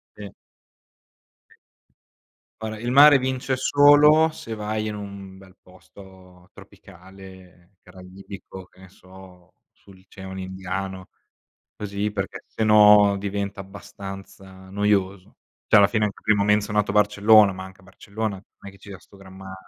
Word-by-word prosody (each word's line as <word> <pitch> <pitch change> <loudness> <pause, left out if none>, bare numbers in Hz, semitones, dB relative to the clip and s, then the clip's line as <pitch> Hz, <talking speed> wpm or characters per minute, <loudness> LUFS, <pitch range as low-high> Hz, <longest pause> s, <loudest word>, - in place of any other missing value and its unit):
Sì. - - -10 2.3
Guarda 110 -1 -7
il 120 +2 -5
mare 145 +2 +7
vince 130 0 -3
solo 145 +3 +4
se 115 -7 -9
vai 110 0 -4
in 105 - -5
un 100 -2 -10
bel 95 -1 -19
posto 90 -1 -19
tropicale, 95 0 -17
caraibico, 95 +1 -13
che 90 - -26
ne 95 0 -16
so, 95 -2 -18 0.2
sull'oceano 95 0 -13
indiano, 95 0 -7 0.7
così, 105 0 -4
perché - - -6
se 110 - -4
no 105 -1 +5
diventa 100 +1 -5
abbastanza 95 -1 -12
noioso. 100 -1 -2 0.3
Cioè, - - +3
alla 100 -1 +5
fine 110 +1 -1
anche 100 - -7
prima 105 -1 +1
ho - - -2
menzionato 105 -1 0
Barcellona, 105 0 +4
ma 95 0 -9
anche 95 0 -16
a - - -23
Barcellona 100 +2 -6
non 95 +1 -17
è - - -15
che 100 - -19
ci 100 - -16
sia 95 -2 -10
'sto 100 - -22
gran 95 -1 -15
ma 95 0 -11
100 Hz, 140 wpm, -22 LUFS, 95-105 Hz, 2.3 s, mare